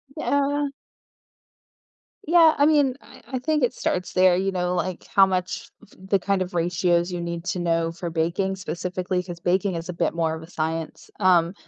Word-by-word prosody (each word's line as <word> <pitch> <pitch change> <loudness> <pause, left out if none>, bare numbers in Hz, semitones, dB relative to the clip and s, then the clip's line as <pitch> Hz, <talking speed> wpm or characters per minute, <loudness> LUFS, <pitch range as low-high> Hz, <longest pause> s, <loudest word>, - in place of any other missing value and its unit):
Yeah. 285 -1 0 1.6
Yeah, 330 -1 +6
I 285 - +4
mean, 290 -4 +3
I - - -16
I 260 - -3
think 300 +2 0
it 245 - +2
starts 180 -7 -2
there, 185 -1 +5
you 190 +2 0
know, 180 -1 -1
like 180 0 -3
how 195 - +5
much 185 -1 -3
f - - -18
the 190 +1 0
kind 195 +1 0
of 185 0 -3
ratios 175 +1 +1
you 175 -1 -3
need 170 0 -5
to 180 - -2
know 165 -1 0
for 170 +1 -5
baking, 170 +4 -1
specifically, 180 +1 -3
'cause 175 -2 -8
baking 185 +2 0
is 165 +1 -6
a - - -3
bit 170 - 0
more 165 -1 0
of 160 - -8
a 160 - -13
science, 160 -1 -4
um, 175 -2 +4
180 Hz, 190 wpm, -24 LUFS, 170-195 Hz, 1.6 s, Yeah